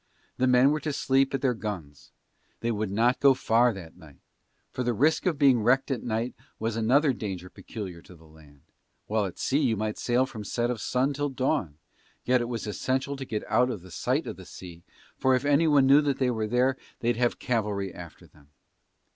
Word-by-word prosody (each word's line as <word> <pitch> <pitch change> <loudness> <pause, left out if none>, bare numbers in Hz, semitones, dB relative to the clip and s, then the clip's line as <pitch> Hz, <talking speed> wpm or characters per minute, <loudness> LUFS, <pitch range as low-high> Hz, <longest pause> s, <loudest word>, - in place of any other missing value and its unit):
The 130 - +2
men 125 +2 +5
were 155 - 0
to 150 0 -3
sleep 135 0 +2
at 135 - -3
their 130 -2 +3
guns. 95 - -7 0.5
They 120 - 0
would 110 -2 -2
not 115 +6 +2
go 140 -1 +5
far 120 0 +3
that 90 -6 -10
night; 75 -3 -16 0.5
for - - -4
the 120 -1 0
risk 155 - +2
of 165 -5 +1
being 135 -5 +4
wrecked 130 +5 +2
at 125 -4 -1
night 115 +1 -2 0.2
was 110 0 -2
another 130 +6 +3
danger 95 -5 -6
peculiar 95 -6 -8
to 90 - -15
the 80 -1 -19
land, 75 -3 -19 0.4
while 105 -1 0
at 90 - -10
sea 140 - +1
you 120 -7 +1
might 105 +1 -3
sail 125 +2 +2
from 110 -5 -8
set 120 +4 -1
of 115 -5 -4
sun 130 +6 0
till 145 +1 -2
dawn: 130 - -1 0.5
yet 125 0 +3
it 120 - -3
was 115 -2 -4
essential 130 +6 -2
to 135 -1 -6
get 110 -4 -3
out 125 +4 +3
of 95 -6 -7
sight - - -1
of - - -6
the - - -11
sea 85 -2 -11 0.4
for 130 0 +3
if 130 +2 -1
anyone 145 -1 +4
knew 140 +2 +6
they 135 -3 0
were 110 -2 -2
there 125 +3 +2 0.2
they'd 120 0 +1
have 120 0 +1
cavalry 105 -6 -2
after 85 -2 -11
them. 70 -1 -23
120 Hz, 205 wpm, -27 LUFS, 105-135 Hz, 0.5 s, knew